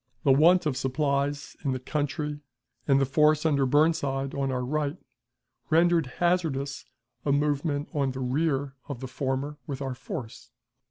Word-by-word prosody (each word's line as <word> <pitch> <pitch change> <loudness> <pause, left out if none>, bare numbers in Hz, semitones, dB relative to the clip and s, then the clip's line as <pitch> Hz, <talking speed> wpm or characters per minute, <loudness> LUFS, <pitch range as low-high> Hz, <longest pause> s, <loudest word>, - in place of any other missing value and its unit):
The 135 - +5
want 170 +6 +5
of 150 -4 0
supplies 140 +2 -1
in 135 - 0
the 130 - -3
country 150 +2 -2 0.5
and 135 -1 +5
the 135 - +3
force 150 +3 +3
under 140 -4 +3
Burnside 140 -2 +2
on 135 -1 -1
our 125 -1 -1
right 150 +3 -1 0.7
rendered 165 -2 +4
hazardous 160 -6 0 0.4
a 145 - +1
movement 145 +1 0
on 140 -2 +1
the 130 0 -5
rear 135 +1 0 0.2
of 140 -4 -5
the 130 - -5
former 135 +2 -3
with 140 -3 -4
our 135 -2 -3
force. 120 -1 -7
140 Hz, 155 wpm, -27 LUFS, 135-150 Hz, 0.7 s, The